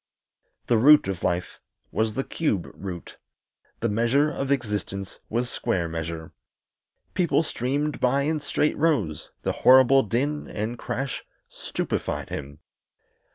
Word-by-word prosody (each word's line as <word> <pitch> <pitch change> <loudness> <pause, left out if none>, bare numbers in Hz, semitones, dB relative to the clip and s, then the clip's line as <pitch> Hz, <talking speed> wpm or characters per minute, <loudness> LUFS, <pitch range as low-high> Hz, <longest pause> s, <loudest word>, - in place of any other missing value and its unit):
The 115 - +3
root 145 0 +7
of 95 -3 -3
life 90 0 -1 0.3
was 110 -1 0
the 135 - 0
cube 110 - -1
root; 90 -3 -7 0.6
the 115 - +2
measure 120 +7 +2
of 135 -2 -3
existence 105 -6 -2
was 120 +2 0
square 85 -7 -1
measure. 80 0 -5 0.8
People 170 -3 +2
streamed 145 +1 -2
by 135 +3 +2
in 155 +2 0
straight 150 +1 0
rows; 145 - 0
the - - +1
horrible 130 +1 +7
din 135 +7 -1
and 110 +3 -4
crash 125 +2 -3 0.3
stupefied - - -3
him. 70 +2 -6
120 Hz, 125 wpm, -25 LUFS, 100-140 Hz, 0.8 s, root